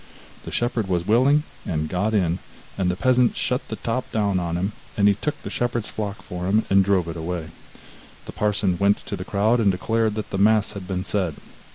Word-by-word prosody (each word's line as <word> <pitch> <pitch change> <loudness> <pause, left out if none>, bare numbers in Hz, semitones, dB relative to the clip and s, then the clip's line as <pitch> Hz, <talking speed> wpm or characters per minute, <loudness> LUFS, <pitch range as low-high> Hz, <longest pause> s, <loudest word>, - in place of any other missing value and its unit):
The - - -6
shepherd 120 -3 0
was 90 -2 0
willing, 130 +8 +4 0.2
and 80 -3 -2
got 100 +6 0
in, 90 -3 +1 0.4
and 95 -2 0
the 90 - 0
peasant 125 +4 +3
shut 125 +1 -1
the 110 - -4
top 115 +3 -3
down 100 -4 +1
on 85 -1 -2
him; 95 +4 -1 0.2
then 100 - +2
he 100 - +6
took 145 +9 -3
the - - -5
shepherd's 120 -2 -1
flock 105 -2 -4
for 90 0 -5
himself, 105 +2 +1
and 100 0 +6
drove 95 -3 +2
it 85 - -5
away. 80 -1 -4 0.8
The - - -7
parson 100 -3 0
went 100 +1 +2
to - - -3
the 90 - -5
crowd, 105 +5 +2
and 105 -4 +4
declared 110 +3 0
that 110 -2 -5
the 95 - -1
mass 105 0 +4
had 100 -3 -8
been 95 -1 -2
said. 90 -8 -1
100 Hz, 215 wpm, -23 LUFS, 90-110 Hz, 0.8 s, he